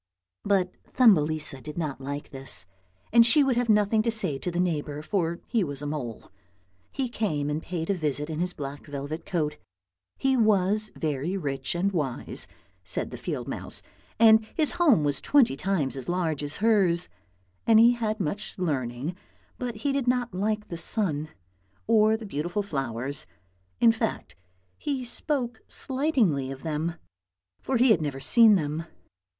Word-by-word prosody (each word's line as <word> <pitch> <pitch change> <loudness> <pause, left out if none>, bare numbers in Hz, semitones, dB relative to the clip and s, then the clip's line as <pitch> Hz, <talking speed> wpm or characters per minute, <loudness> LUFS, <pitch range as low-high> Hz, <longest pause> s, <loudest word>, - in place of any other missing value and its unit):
But 190 -3 +1 0.2
Thumbelisa 155 - +3
did 150 +3 -9
not 150 -5 -3
like 140 +2 -6
this, 135 -1 -1 0.5
and 235 0 +8
she 285 +6 +5
would 270 -2 +1
have 245 -1 0
nothing 210 +1 +4
to 230 - 0
say 215 -11 +1
to 180 - -3
the 175 0 -3
neighbour, 150 -4 -1
for 170 -2 -1
he 230 -4 +1
was 145 -3 -5
a - - -4
mole. 140 -7 -5 0.6
He 265 -2 -2
came 155 -12 -2
and 150 +2 -2
paid 165 -2 -4
a - - +3
visit 150 -4 -2
in 160 -1 -4
his 180 +1 -2
black 140 +1 -7
velvet 145 +3 -6
coat. 150 -5 -1 0.6
He 270 0 +2
was 215 -2 +3
very 155 +4 -2
rich 135 -4 -2
and 190 +3 +1
wise, 145 -9 -1 0.4
said 90 -2 -2
the - - -6
field - - -4
mouse, - - -3 0.4
and 220 -1 +7
his 310 -3 +2
home 295 - +4
was 145 -2 0
twenty 275 - +4
times 155 -4 -1
as 135 +2 -5
large 170 -5 -1
as 145 0 -4
hers; 195 -6 +3 0.6
and 225 -1 +6
he 235 +1 +7
had 220 -2 -2
much 200 +4 -4
learning, 140 -2 -2 0.4
but 245 -2 -3
he 240 +7 -1
did 275 -2 -1
not 245 -4 +1
like 210 +3 -2
the 170 - -4
sun 160 -5 +2 0.6
or 220 -1 +4
the 220 - -9
beautiful 175 +3 -2
flowers, 135 - -3 0.5
in 230 - +6
fact 225 - -3 0.4
he 270 -4 -3
spoke 245 -2 -2
slightingly 255 - 0
of 135 0 -8
them, 160 +1 -2 0.7
for 265 - 0
he 245 0 +5
had 170 - +4
never 145 -3 -3
seen 225 - +7
them. 155 -1 -2
180 Hz, 165 wpm, -26 LUFS, 150-220 Hz, 0.7 s, and